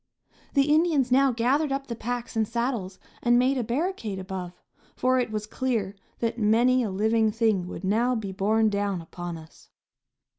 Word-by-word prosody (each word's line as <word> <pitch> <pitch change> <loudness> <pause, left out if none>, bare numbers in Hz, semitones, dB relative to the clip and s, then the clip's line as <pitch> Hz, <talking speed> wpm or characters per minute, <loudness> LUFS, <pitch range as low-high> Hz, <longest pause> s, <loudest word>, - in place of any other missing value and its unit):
The 280 +1 +4
Indians 305 -6 +2
now 270 +1 +5
gathered 265 +6 +1
up 275 0 -2
the 235 - -5
packs 240 +1 -4
and 220 -1 +1
saddles 235 -5 -2 0.2
and 240 0 +4
made 255 +2 +3
a - - 0
barricade 240 - -2
above, 185 -2 -6 0.4
for 255 0 +2
it 245 -2 -1
was 215 -1 -3
clear 220 -4 -2 0.3
that 230 0 -1
many 235 +4 +4
a 225 - -1
living 220 +3 +2
thing 215 -5 +1
would 185 - -7
now 230 +6 +2
be 210 -4 -4
borne 215 +3 +2
down 200 -2 -1
upon 170 +1 -7
us. 160 0 -16
230 Hz, 175 wpm, -26 LUFS, 200-255 Hz, 0.4 s, now